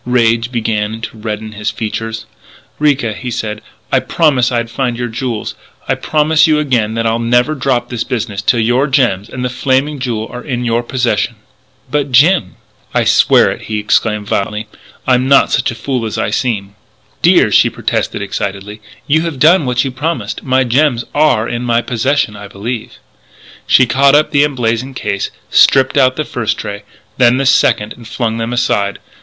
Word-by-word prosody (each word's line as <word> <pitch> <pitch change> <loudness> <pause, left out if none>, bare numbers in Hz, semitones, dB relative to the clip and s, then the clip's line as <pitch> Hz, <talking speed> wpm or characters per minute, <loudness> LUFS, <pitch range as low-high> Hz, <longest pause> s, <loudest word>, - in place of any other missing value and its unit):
Rage 115 -1 +1
began 110 -2 -2
to 115 - -7
redden 110 0 -5
his 105 0 -3
features. 110 0 -4 0.5
"Ricca," 140 -7 +1
he 125 +4 -6
said, 110 -3 -4 0.3
"I - - +4
promised 135 -6 +1
I'd 115 -1 -2
find 120 -1 -2
your 120 0 -3
jewels.... 115 -2 -4 0.3
I - - +2
promise 155 +1 +2
you 155 -1 +3
again 120 -7 0
that 115 0 -1
I'll 115 +1 +1
never 120 +5 +2
drop 130 -4 -1
this 120 -3 -3
business 105 -4 -3
until 115 +2 +2
your 120 +5 +2
gems 120 -7 +1
and 125 0 -4
the - - +1
Flaming 135 +3 0
Jewel 115 -4 -3
are 125 - -7
in 125 -3 -3
your 115 0 +1
possession 125 0 -1 0.3
" - - -32
"But, 145 -2 -1
Jim 140 - +3 0.2
" - - -34
"I - - +3
swear - - +4
it!" - - -7
he 110 - -3
exclaimed 105 0 0
violently. 105 +2 -2 0.4
"I'm 130 0 +2
not 140 0 +4
such - - +1
a 115 - -5
stupid - - -16
fool 130 -4 -1
as 110 - -5
I - - -1
seem 105 -4 -2 0.3
" - - -37
"Dear!" - - +4
she - - +5
protested - - -2
excitedly, 100 +1 -5 0.2
"you 155 +2 +2
have 165 -4 -4
done 155 +1 +4
what 125 +1 +1
you 135 - -2
promised. 130 -5 -3
My 130 0 +2
gems 125 -1 +1
are 145 -7 +2
in 120 0 -3
my 120 -1 +1
possession 130 -1 0
I 100 0 -9
believe 110 +4 -5 0.4
" - - -27 0.3
She 130 - +5
caught 135 +4 +4
up 150 +1 +3
the 145 -1 +4
emblazoned 130 -2 -1
case, 100 -4 -2 0.2
stripped 130 0 +4
out 130 -2 +3
the 155 - -2
first 115 -3 -2
tray, 100 0 -6 0.3
then 125 0 +5
the 135 - 0
second, 115 -5 +2
and 120 -2 -13
flung 115 -1 -2
them 115 +1 -3
aside. 100 -5 0
120 Hz, 190 wpm, -14 LUFS, 110-135 Hz, 0.5 s, she